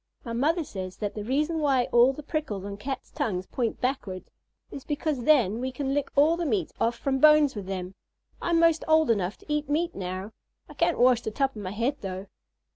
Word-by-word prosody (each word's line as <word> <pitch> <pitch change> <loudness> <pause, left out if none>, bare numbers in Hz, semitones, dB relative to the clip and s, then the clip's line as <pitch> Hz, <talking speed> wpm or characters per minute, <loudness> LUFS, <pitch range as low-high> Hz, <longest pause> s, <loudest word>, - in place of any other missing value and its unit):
My 230 - -5
mother 315 +8 +1
says 185 -8 -7
that 205 -2 -3
the 210 - -5
reason 300 +8 0
why 275 -4 +3
all 240 +2 +6
the 295 +3 -9
prickles 275 - -3
on 200 0 -5
Cats' 265 +7 -6
tongues 205 -11 -2
point 235 +1 -2
backward 250 -8 -2 0.5
is 275 - -8
because 295 -4 -2
then 235 -8 +4
we 260 +1 -2
can 270 +1 -2
lick 290 0 -1
all 300 +4 +5
the 345 - -3
meat 205 - 0
off 235 +1 +1
from 270 +1 -1
bones 300 -1 +6
with 200 -3 -6
them. 185 -1 -4 0.5
I'm 340 -1 +2
'most 330 -1 +4
old 315 -4 +4
enough 200 -3 -1
to - - -20
eat 300 -1 -1
meat 335 +4 0
now. 185 +2 -5 0.4
I - - -12
can't - - +1
wash 245 -1 +4
the - - -3
top 270 +4 -1
of 210 - -7
my 185 - -4
head 235 +8 -1
though. 190 0 -5
255 Hz, 215 wpm, -27 LUFS, 205-295 Hz, 0.5 s, all